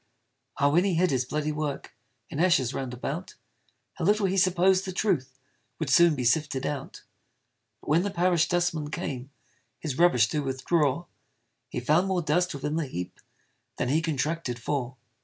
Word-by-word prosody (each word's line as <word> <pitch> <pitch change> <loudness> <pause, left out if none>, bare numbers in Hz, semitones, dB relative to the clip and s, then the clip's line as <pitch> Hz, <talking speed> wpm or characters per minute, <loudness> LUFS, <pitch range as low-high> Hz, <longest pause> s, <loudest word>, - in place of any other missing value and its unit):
Ah! 140 - +3
when 170 +5 +3
he 195 -3 +1
hid 180 0 +2
his 130 -2 +1
bloody 150 +3 -2
work 150 -2 -4 0.4
In 150 - -4
ashes 170 -8 +3
round 130 -2 -4
about, 140 +8 -5 0.6
How 175 - -6
little 205 +1 +3
he 190 0 0
supposed 185 0 +3
the 190 - -4
truth 155 -10 -1 0.4
Would 155 -5 -2
soon 170 +1 +6
be 130 - -3
sifted 135 +1 +1
out. 140 -2 -5 0.8
But - - -10
when 165 +3 +4
the 205 - -1
parish 175 -3 +2
dustman 175 -4 0
came, 135 -3 -5 0.5
His 150 -4 -5
rubbish 125 -11 +5
to 150 - -1
withdraw, 145 +4 0 0.6
He - - -3
found 155 +9 +2
more 185 -2 0
dust 175 +3 +1
within 150 +3 -2
the 160 -3 -1
heap 90 -8 -6 0.6
Than 125 - -1
he 155 +4 +2
contracted 155 -4 -2
for! 125 0 -3
155 Hz, 170 wpm, -27 LUFS, 135-175 Hz, 0.8 s, soon